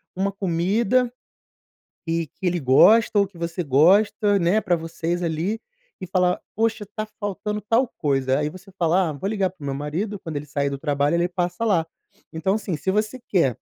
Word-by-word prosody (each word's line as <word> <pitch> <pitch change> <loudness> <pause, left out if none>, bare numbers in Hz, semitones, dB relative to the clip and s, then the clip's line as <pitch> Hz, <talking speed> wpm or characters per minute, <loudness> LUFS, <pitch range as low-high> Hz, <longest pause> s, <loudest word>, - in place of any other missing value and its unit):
uma 195 +2 0
comida, 200 +7 +1 1.0
e 165 0 -1
que 185 - -7
ele 175 0 +1
gosta 205 - +5
ou 200 - +4
que 190 -2 -18
você 170 +1 -3
gosta, 200 +8 +4
né, 180 +4 +2
para 185 -5 +1
vocês 165 +1 -3
ali, 170 +7 -1 0.4
e 185 - -5
falar: 180 0 +1 0.2
"Poxa, 220 -1 0
tá 215 0 -2
faltando 210 +1 -3
tal 230 +5 +2
coisa." 135 -2 +1
Aí 150 0 0
você 185 +3 -14
fala: 175 +1 +2
"Ah, - - -4
vou 145 +7 -4
ligar 200 -3 0
para 175 -4 -21
o - - -7
meu 135 - -2
marido, 170 +9 -3
quando 160 -4 -6
ele 145 +1 -4
sair 140 0 -1
do 140 - -4
trabalho 145 +1 0
ele 175 +1 +1
passa 180 +3 -2
lá." 180 -7 +2 0.5
Então 165 +5 0
assim, 205 -5 -2
se 150 +6 -2
você 215 +5 -1
quer, 140 - +2
180 Hz, 190 wpm, -23 LUFS, 160-205 Hz, 1.0 s, gosta